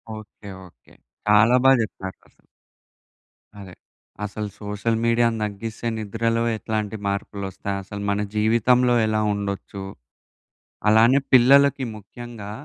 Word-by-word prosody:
Okay. 105 -1 -12 0.2
Okay. - - -24 0.3
చాలా 105 +4 +5
బా 135 - +7
జెప్పారు 95 -3 -5
అసలు. - - -32 1.1
అదే. 95 -2 -11 0.5
అసలు 105 +1 -5
సోషల్ 105 +2 -2
మీడియా‌ని 115 -1 +2
తగ్గిస్తే 110 +3 -5
నిద్రలో 115 +2 -1
ఎట్లాంటి 110 -1 -3
మార్పులోస్తాయి, 100 0 -4
అసలు 100 +1 -8
మన 100 +1 0
జీవితంలో 120 +3 +3
ఎలా 110 0 0
ఉండొచ్చు, 100 -1 -5 1.1
అలానే 115 +5 +5
పిల్లలకి 135 +2 +5
ముఖ్యంగా 105 0 -10
110 Hz, 105 wpm, -23 LUFS, 100-115 Hz, 1.1 s, బా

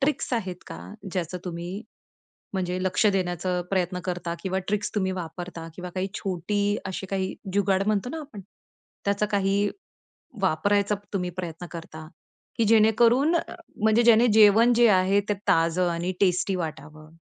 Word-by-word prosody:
Tricks 275 -1 -1
आहेत 190 -7 -2
का 80 - -8 0.3
ज्याचं 180 -1 -3
तुम्ही 170 -1 -5 0.8
म्हणजे 185 -2 -2
लक्ष 185 +3 +2
देण्याचं 180 -2 0
प्रयत्न 180 -1 0
करता? 175 -2 -3
किंवा 190 0 -1
ट्रिक्स 205 0 -1
तुम्ही 190 -3 0
वापरता 165 0 -7
किंवा 180 0 -7
काही 190 +1 -1
छोटी 195 +1 -2 0.3
अशी 190 - -5
काही 190 -1 -1 0.2
जुगाड 195 -1 +2
म्हणतो 215 +2 0
ना 320 - -5
आपण, 280 -9 -10 0.6
त्याचा 200 +1 +1
काही 200 +1 +1 0.7
वापरायचा 200 +4 +2 0.2
तुम्ही 180 -2 -1
प्रयत्न 170 0 -6
करता, 160 -2 -9 0.5
की 230 - +3
जेणेकरून 235 +7 +4
अ 335 - -2 0.3
म्हणजे 220 +2 +4
ज्याने 235 +1 +6
जेवण 220 +3 +7
जे 240 - +7
आहे 195 +2 +3
ते - - +3
ताजं 175 -1 +3
आणि 170 +2 -2
टेस्टी 185 0 +2
वाटावं? 155 0 -8
190 Hz, 145 wpm, -25 LUFS, 175-210 Hz, 0.8 s, जेवण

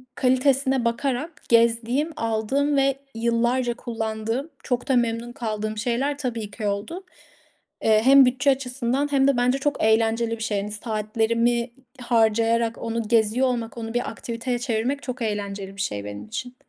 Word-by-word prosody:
kalitesine 260 0 +2
bakarak 270 +6 -2
gezdiğim 235 +6 +3
aldığım 230 +6 0
ve 275 0 +3 0.2
yıllarca 235 +2 +1
kullandığım 225 +3 -3
çok 245 -1 -2
da 265 - +4
memnun 235 0 0
kaldığım 215 -4 -4
şeyler 245 +6 -1
tabii 230 -7 -4
ki 210 0 -4
oldu. 205 - -3 0.8
Eee, 215 -1 +4
hem 270 +1 +8
bütçe 255 +3 +3
açısından 265 +1 -1
hem 270 -1 +3
de 275 -3 +3
bence 250 +2 +2
çok 290 +1 -1
eğlenceli 225 +1 +2
bir 220 - -5
şey, 205 -3 -1
hani, 210 +1 -5
saatlerimi 230 +2 0 0.3
harcayarak 230 0 +2
onu 230 -1 -3
geziyor 230 +3 +3
olmak 235 -2 -3
onu 225 -1 -5
bir 240 0 -1
aktiviteye 240 +1 -4
çevirmek 245 +3 -1
çok 255 0 -5
eğlenceli 200 -3 -3
bir - - -3
şey 105 - -3
benim 105 0 -7
için. 245 +3 -6
235 Hz, 150 wpm, -24 LUFS, 220-255 Hz, 0.8 s, hem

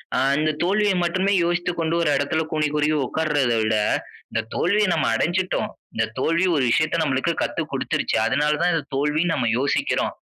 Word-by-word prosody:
ஆ - - +1 0.2
இந்த 155 0 +1
தோல்விய 205 +2 +2
மட்டுமே 185 +3 +1
யோசித்துக்கொண்டு 175 -1 -1
1 160 - +1
எடத்தில 145 +3 0
கூனி 155 -1 +1
குறுகி 150 +1 +1
உட்கார்ரத 150 -6 0
விட 110 0 +1 0.6
இந்த - - 0
தோல்விய 205 +3 +2
நம்ம - - 0
அடஞ்சுட்டோம். 185 - 0 0.3
இந்த 110 0 +1
தோல்வி 165 +6 +1
1 135 - +1
விஷயத்த 155 +4 +1
நம்மளுக்கு 140 +4 0
கத்து - - -2
குடுத்துருச்சு. - - -1
அதனால 150 0 +1
தான் 175 -1 +2
இந்த 155 -4 -2
தோல்வினு 150 +4 +1
நம்ம 120 -3 0
யோசிக்கிறோம். 140 - 0
160 Hz, 165 wpm, -22 LUFS, 145-175 Hz, 0.6 s, தோல்விய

